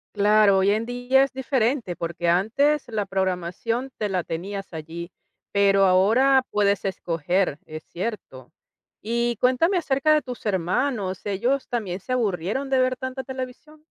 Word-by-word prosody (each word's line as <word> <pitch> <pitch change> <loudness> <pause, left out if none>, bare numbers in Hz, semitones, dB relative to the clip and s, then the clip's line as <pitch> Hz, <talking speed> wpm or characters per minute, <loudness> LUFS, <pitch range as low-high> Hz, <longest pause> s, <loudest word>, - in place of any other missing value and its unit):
Claro, 210 -1 +4
hoy 190 +1 +3
en 215 +2 0
día 245 +2 +2
es 275 - -2
diferente, 255 -6 -1
porque 170 +1 -4
antes 235 - +2
la 215 -3 -2
programación 190 +7 -2
te 210 -2 -2
la 180 -3 -1
tenías 195 +3 -5
allí, 165 +2 -7 0.4
pero 195 -1 +4
ahora 230 +9 +4
puedes 205 -1 +1
escoger, 175 -3 -1
es 155 0 -8
cierto. 170 - -6 0.5
Y 235 +1 -1
cuéntame 260 +10 +3
acerca 310 -2 +2
de 305 - +3
tus 250 -4 -9
hermanos, 195 +1 -1
¿ellos 240 +7 -1
también 195 -6 -3
se 255 - -8
aburrieron 220 +2 -1
de 265 -1 +2
ver 255 0 +1
tanta 260 0 -5
televisión? 265 +4 -8
215 Hz, 145 wpm, -24 LUFS, 185-255 Hz, 0.5 s, Claro